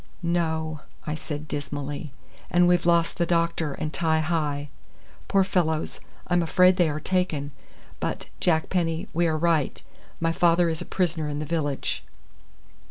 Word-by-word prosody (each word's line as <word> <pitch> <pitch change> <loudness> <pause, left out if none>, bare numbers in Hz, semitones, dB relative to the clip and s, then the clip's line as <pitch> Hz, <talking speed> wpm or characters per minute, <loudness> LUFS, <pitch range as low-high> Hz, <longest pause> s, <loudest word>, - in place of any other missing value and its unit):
"No," 160 -2 0 0.3
I 150 - -2
said 155 -1 -5
dismally, 145 0 -4 0.4
"and 175 0 +4
we've 175 -1 +3
lost 170 -1 +3
the 170 - +3
doctor 170 -3 +1
and 155 +2 -4
Ti 160 -2 +2
hi. 150 -3 -1 0.6
Poor 195 -1 +4
fellows, 165 -5 0 0.3
I'm 175 0 +2
afraid 180 +2 +5
they 175 -4 +4
are 150 0 -2
taken. 155 -5 -1 0.5
But, - - -3
Jack 160 -3 +2
Penny, 165 -3 0
we 170 +1 +2
are 160 -1 +1
right. 160 -3 +1 0.4
My 165 0 +1
father 170 0 +4
is 160 -1 -2
a - - -5
prisoner 165 -4 0
in 145 - -3
the 155 - -3
village." 145 -3 -1
160 Hz, 155 wpm, -26 LUFS, 155-175 Hz, 0.6 s, afraid